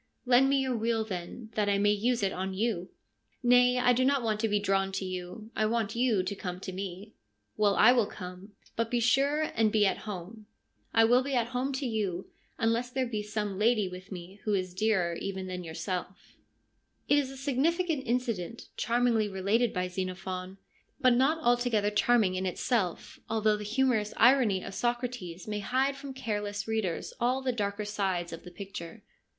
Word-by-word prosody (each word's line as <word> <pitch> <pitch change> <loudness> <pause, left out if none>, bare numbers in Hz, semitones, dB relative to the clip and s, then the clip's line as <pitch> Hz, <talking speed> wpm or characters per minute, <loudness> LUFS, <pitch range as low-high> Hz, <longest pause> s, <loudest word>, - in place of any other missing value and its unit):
' - - -46
Lend 255 +2 +5
me 275 - +3
your 260 -2 0
wheel, 225 0 0
then, 195 +3 -6
that 205 -1 +1
I 200 - +3
may 205 +1 +3
use 230 +2 +1
it 195 - +1
on 190 +1 -3
you.' 200 -4 -1 0.3
' - - -43
Nay, 250 +1 +5
I 250 0 +4
do 255 +2 +2
not 275 -1 +2
want 215 -2 0
to 225 - +1
be 205 0 +2
drawn 195 -1 +1
to 190 0 -2
you. 185 +4 -6
I 215 - +2
want 225 -1 -1
you 235 -6 +2
to 195 +2 -3
come 180 -2 -5
to 190 - -5
me.' 190 +2 -6 0.2
' 105 0 -49
Well, 205 -2 +3
I 225 - +7
will 240 -5 +3
come. 180 +2 -9 0.2
But 230 0 -1
be 245 - +1
sure 280 +6 +2
and 220 -1 +2
be 210 -1 +4
at 195 - +1
home/ 205 +3 -7 0.2
' - - -48
I 225 - +5
will 245 +3 +5
be 275 0 -2
at 235 -1 +1
home 255 +3 -1
to 265 +1 -2
you, 205 -6 -2 0.3
unless 230 +2 +1
there 260 +1 -1
be 220 -3 -3
some 210 -2 -3
lady 215 -2 +3
with 185 +1 -10
me 185 +2 -8
who 210 -2 +1
is 185 -2 -2
dearer 185 -3 +1
even 190 -1 -4
than 180 -1 -5
yourself/ 175 +3 -5 0.7
It 290 - +5
is 275 -2 -2
a 270 - -9
significant 290 +2 0
incident, 230 -4 -2
charmingly 235 -3 +2
related 205 +5 +1
by 180 -1 -1
Xenophon, 185 0 -5 0.4
but 255 -2 +5
not 270 +6 +3
altogether 240 -4 +2
charming 210 -2 +3
in 185 +1 -1
itself, 185 -1 -1
although 215 -1 +2
the 210 - -6
humorous 220 -1 +1
irony 235 -6 +5
of 195 - -7
Socrates 240 -7 -3
may 210 -1 -2
hide 260 +6 +1
from 275 -1 -8
careless 205 -4 -3
readers 220 -6 -2
all 255 +3 +1
the 260 - +1
darker 205 -2 -2
sides 190 -5 -2
of 165 - -8
the 180 - -9
picture. 175 -2 -8
215 Hz, 200 wpm, -29 LUFS, 190-245 Hz, 0.7 s, I